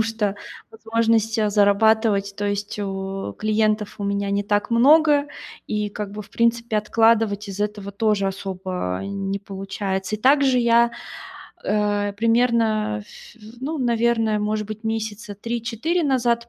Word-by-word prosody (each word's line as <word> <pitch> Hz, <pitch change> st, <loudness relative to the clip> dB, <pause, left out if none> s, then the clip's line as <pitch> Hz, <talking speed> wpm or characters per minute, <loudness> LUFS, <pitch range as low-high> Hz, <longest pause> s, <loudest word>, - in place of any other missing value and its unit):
потому -, -, +5 dB
что 220 Hz, -3 st, -1 dB, 0.4 s
возможности 225 Hz, 0 st, +1 dB
зарабатывать, 205 Hz, 0 st, +3 dB
то 205 Hz, -, -2 dB
есть 205 Hz, +1 st, -3 dB
у 195 Hz, -, -4 dB
клиентов 215 Hz, -1 st, 0 dB
у -, -, -2 dB
меня 200 Hz, 0 st, -1 dB
не 200 Hz, 0 st, 0 dB
так 205 Hz, +2 st, 0 dB
много, 290 Hz, +4 st, +5 dB, 0.4 s
и, 210 Hz, -1 st, -1 dB
как 205 Hz, -1 st, -6 dB
бы, 210 Hz, -, -6 dB
в 200 Hz, -, -19 dB
принципе, 235 Hz, 0 st, +1 dB
откладывать 215 Hz, -1 st, +2 dB
из 195 Hz, +1 st, -6 dB
этого 205 Hz, -1 st, -3 dB
тоже 205 Hz, -1 st, +1 dB
особо 185 Hz, -, -4 dB
не 195 Hz, 0 st, -3 dB
получается. 195 Hz, 0 st, -4 dB
И -, -, -17 dB
также 270 Hz, +1 st, +4 dB
я, 235 Hz, 0 st, +4 dB, 0.7 s
э, 205 Hz, -1 st, 0 dB
примерно, 225 Hz, -, +2 dB
ф 105 Hz, -, -15 dB, 0.2 s
ну, 300 Hz, +4 st, -3 dB
наверно, 235 Hz, -3 st, +1 dB
может 210 Hz, 0 st, -1 dB
быть, 215 Hz, +1 st, -8 dB
месяца 220 Hz, -1 st, -4 dB
3-4 235 Hz, -, -2 dB
назад 240 Hz, -4 st, +1 dB
215 Hz, 140 wpm, -22 LUFS, 200-230 Hz, 0.7 s, потому